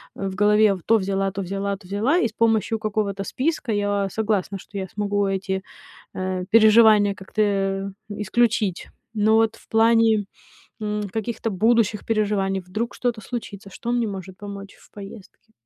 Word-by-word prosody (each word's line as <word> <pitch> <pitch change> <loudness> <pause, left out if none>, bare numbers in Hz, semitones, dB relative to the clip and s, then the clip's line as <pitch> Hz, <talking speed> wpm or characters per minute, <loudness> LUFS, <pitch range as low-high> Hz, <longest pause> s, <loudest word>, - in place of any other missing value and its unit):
в 195 -1 -4
голове: 210 0 +4
то 225 - +4
взяла, 195 -1 -1
то 195 +1 -4
взяла, 195 +2 -2
то 190 -2 -17
взяла,- 215 - +1
и - - +2
с 220 - -12
помощью 225 0 +1
какого-то 205 -2 -2
списка, 275 - -2
я 205 -1 0
согласна, 205 -2 -1
что 200 - -10
я 190 -1 -3
смогу 205 0 -1
эти, 190 0 -2 0.5
э, 185 0 -3
переживания 215 -2 +6
как-то, 190 +3 -4
э, 195 -1 0 0.2
исключить. 210 -1 0 0.3
Но 215 0 +3
вот 225 0 +2
в - - -22
плане, 225 -1 +4 0.6
м, 210 -1 -2
каких-то 225 +1 -3
будущих 215 +1 +1
переживаний, 205 -3 0
вдруг 215 +6 -4
что-то 240 -3 -2
случится, 205 -4 -7
что 235 +5 -4
мне 240 -1 +1
может 190 -1 -8
помочь 200 -1 -8
в - - -22
поездке? 205 +1 -12
205 Hz, 155 wpm, -23 LUFS, 195-225 Hz, 0.6 s, переживания